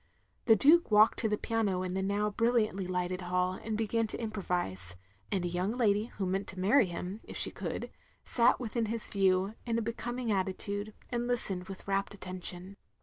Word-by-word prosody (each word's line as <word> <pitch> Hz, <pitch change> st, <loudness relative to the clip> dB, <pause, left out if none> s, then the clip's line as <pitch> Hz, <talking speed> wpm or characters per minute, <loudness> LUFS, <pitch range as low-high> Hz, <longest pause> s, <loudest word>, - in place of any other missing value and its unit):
The 225 Hz, -, +7 dB
Duke 315 Hz, +10 st, +5 dB
walked 215 Hz, 0 st, +5 dB
to 220 Hz, -, +1 dB
the 210 Hz, -, +1 dB
piano 205 Hz, -6 st, 0 dB
in 180 Hz, -1 st, -3 dB
the 190 Hz, -, -1 dB
now 205 Hz, +2 st, 0 dB
brilliantly 215 Hz, -4 st, +1 dB
lighted 180 Hz, 0 st, -2 dB
hall, 180 Hz, +1 st, 0 dB
and 220 Hz, -1 st, -2 dB
began 225 Hz, +1 st, 0 dB
to -, -, -6 dB
improvise; 175 Hz, -, -2 dB, 0.4 s
and 185 Hz, -3 st, 0 dB
a -, -, +1 dB
young 180 Hz, +4 st, -1 dB
lady 215 Hz, -4 st, +2 dB
who 195 Hz, -, -1 dB
meant 190 Hz, +2 st, -1 dB
to 185 Hz, -, -7 dB
marry 215 Hz, +5 st, +4 dB
him 180 Hz, +4 st, -5 dB
if -, -, -8 dB
she -, -, +1 dB
could, -, -, -5 dB, 0.3 s
sat 235 Hz, -1 st, +3 dB
within 230 Hz, -2 st, -1 dB
his 230 Hz, 0 st, -3 dB
view, 190 Hz, 0 st, +2 dB
in 230 Hz, -1 st, -1 dB
a -, -, +1 dB
becoming 235 Hz, +1 st, -3 dB
attitude, 200 Hz, +2 st, -1 dB, 0.2 s
and 240 Hz, 0 st, -1 dB
listened 195 Hz, -7 st, -1 dB
with 190 Hz, 0 st, -9 dB
rapt 195 Hz, 0 st, 0 dB
attention. 185 Hz, 0 st, -6 dB
200 Hz, 190 wpm, -31 LUFS, 185-225 Hz, 0.4 s, The